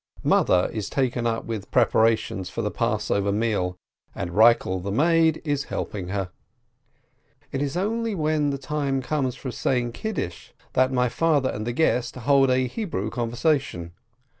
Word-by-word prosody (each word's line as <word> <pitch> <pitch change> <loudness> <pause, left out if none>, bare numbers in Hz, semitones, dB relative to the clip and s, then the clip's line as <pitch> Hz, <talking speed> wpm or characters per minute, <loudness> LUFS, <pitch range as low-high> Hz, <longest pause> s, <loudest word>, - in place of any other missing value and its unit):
Mother 90 0 +3
is 105 -3 -3
taken 125 -3 0
up 115 -1 -2
with 115 -3 -3
the - - -19
preparations 110 -5 +2
for - - -4
the - - -1
Passover 100 0 0
meal, 100 -4 0 0.4
and 85 - -4
Eikel 105 -2 +4
the 100 +2 -4
maid 160 +5 +3
is 145 -2 -1
helping 95 -4 -4
her. 95 -1 -3 1.2
It 135 - -2
is 145 +3 -2
only 225 +3 -1
when 155 -3 +1
the 140 - -2
time 135 -1 -2
comes 130 -2 -1
for 130 -1 -6
saying 120 -1 0
Kiddush 120 - -5 0.2
that 130 +1 +3
my 125 -1 +2
father 145 0 +1
and 110 +2 -5
the - - 0
guest 125 -4 +1
hold 135 +2 +3
a 130 0 +2
Hebrew 125 - -3
conversation. 120 - -1
125 Hz, 160 wpm, -24 LUFS, 110-145 Hz, 1.2 s, Eikel